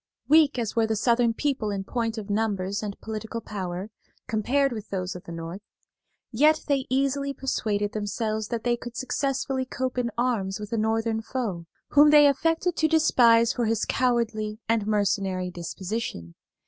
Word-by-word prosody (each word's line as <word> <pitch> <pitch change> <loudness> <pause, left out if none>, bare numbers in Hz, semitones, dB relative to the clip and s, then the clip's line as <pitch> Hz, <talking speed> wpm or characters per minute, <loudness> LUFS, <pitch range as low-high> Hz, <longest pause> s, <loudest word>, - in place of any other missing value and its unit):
Weak 300 -2 +5
as 230 -3 -2
were 225 -1 +3
the 220 - 0
Southern 235 +1 +2
people 265 -7 -1
in 200 -1 -3
point 230 +1 -2
of 210 -2 -5
numbers 205 -2 -1
and 205 -2 -5
political 220 +1 -5
power, 190 -2 -5 0.4
compared 270 +6 +1
with 215 -3 -6
those 185 -1 -3
of 180 - -9
the - - -8
North, 165 +3 -6 0.7
yet 305 +6 +3
they 275 -3 0
easily 275 +1 0
persuaded 210 -6 -1
themselves 215 +1 -2
that 230 -1 -3
they 240 -1 +2
could 240 0 -9
successfully 270 0 -1
cope 255 0 -3
in 240 -1 0
arms 220 -6 0
with 210 +1 -7
a - - +2
Northern 220 +1 0
foe, 220 -8 -4 0.2
whom 295 +1 +6
they 295 -1 +8
affected 325 +5 +2
to 315 - +3
despise 235 -7 +4
for 240 - -1
his 225 -1 0
cowardly 230 -4 0
and 225 -2 +1
mercenary 195 -3 0
disposition. 175 - -5
225 Hz, 165 wpm, -26 LUFS, 205-260 Hz, 0.7 s, they